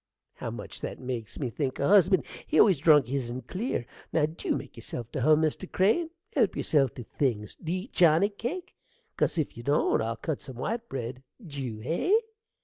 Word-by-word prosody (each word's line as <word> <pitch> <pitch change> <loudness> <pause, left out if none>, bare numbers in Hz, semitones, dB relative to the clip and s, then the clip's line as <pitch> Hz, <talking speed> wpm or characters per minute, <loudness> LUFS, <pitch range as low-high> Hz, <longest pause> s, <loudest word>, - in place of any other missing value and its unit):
How - - -5
much - - -8
that - - -4
makes 125 -4 -5
me 130 -5 -2
think 135 0 -2
o' 140 - +2
husband! 190 -1 +5 0.2
he - - +2
always 190 -9 +6
drunk 150 -3 +6
hisen 125 -1 -3
clear. 185 - -3 0.3
Now, 155 -2 +3
dew 160 +2 -2
make - - -9
yerself 120 -2 -6
to 135 - -3
hum, 155 +3 +5
Mr. 160 +4 -2
Crane: 225 - +2 0.2
help - - +2
yerself 135 -6 +2
to 125 - -6
things. 110 -4 -1
Do 160 - -2
you 185 +1 -1
eat 220 - -13
johnny 170 +3 +5
cake? 265 - -5 0.4
'cause - - +1
if 155 - -1
you 120 - -7
don't 140 0 +2
I'll 115 +1 -1
cut 140 +6 -3
some 130 -2 -9
white 230 - -3
bread. 125 0 -5 0.2
Dew, 135 -8 -5
hey? 170 - +2
150 Hz, 195 wpm, -28 LUFS, 125-185 Hz, 0.4 s, always